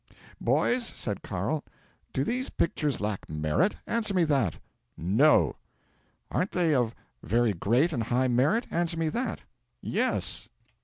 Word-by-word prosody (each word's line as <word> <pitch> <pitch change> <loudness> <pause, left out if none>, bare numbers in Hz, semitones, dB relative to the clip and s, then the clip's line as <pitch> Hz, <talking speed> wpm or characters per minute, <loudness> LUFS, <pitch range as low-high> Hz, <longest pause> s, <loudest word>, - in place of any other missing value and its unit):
'"Boys," 245 0 +2
said - - -3
Carl, - - -2 0.5
"do - - 0
these 250 +3 -1
pictures 150 -4 0
lack 105 -1 -3
merit? 75 - +1
Answer 215 -4 -1
me 180 - +4
that." 135 - +1 0.4
'"No!" 110 - +4 0.7
'"Aren't 185 - 0
they 170 -4 +2
of 120 -4 +1 0.3
very 115 0 +2
great 120 - +2
and 120 - -1
high 125 +3 +1
merit? 140 - +2
Answer 170 -1 0
me 160 -1 +1
that." 240 +10 -2 0.4
'"Yes." - - -1
145 Hz, 135 wpm, -28 LUFS, 115-180 Hz, 0.7 s, me